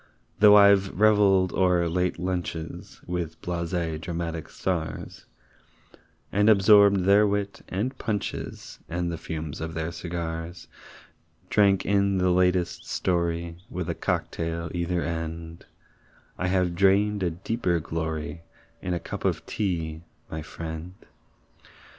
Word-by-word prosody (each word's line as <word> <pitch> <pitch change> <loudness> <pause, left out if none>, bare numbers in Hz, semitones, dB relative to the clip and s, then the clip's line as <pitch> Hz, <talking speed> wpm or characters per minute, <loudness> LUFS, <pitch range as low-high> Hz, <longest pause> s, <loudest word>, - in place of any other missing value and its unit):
Though 105 -1 +8
I've 100 -1 +6
reveled 100 -4 +4
o'er 90 -2 +3
late 90 +2 0
lunches 90 +1 -4
With 85 -2 -4
blasé 85 -2 -2
dramatic 85 -1 -4
stars, 85 -4 -4 1.0
And 105 +2 +3
absorbed 100 -1 +6
their 100 +2 +5
wit 100 0 -2
and 115 +8 -2
punches 105 -4 -4
And 85 0 -2
the 85 - -5
fumes 80 -3 -5
of 80 0 -5
their 80 +1 -2
cigars 85 -1 -5 0.8
Drank 100 -2 +4
in 100 0 +2
the 90 0 +2
latest 90 -1 +1
story, 85 -1 -1
With 90 -2 -3
a - - -1
cock - - -2
tail 85 0 -3
either 85 0 -1
end, 80 0 -5 0.7
I 90 - -2
have 90 -1 +1
drained 100 +3 +3
a 90 - +1
deeper 90 +1 -1
glory 80 +1 -4 0.4
In 90 -1 -2
a - - -2
cup - - -7
of - - 0
tea, 80 -6 -2 0.3
my 80 - -4
friend. 80 +3 -7
90 Hz, 125 wpm, -26 LUFS, 85-95 Hz, 1.0 s, Though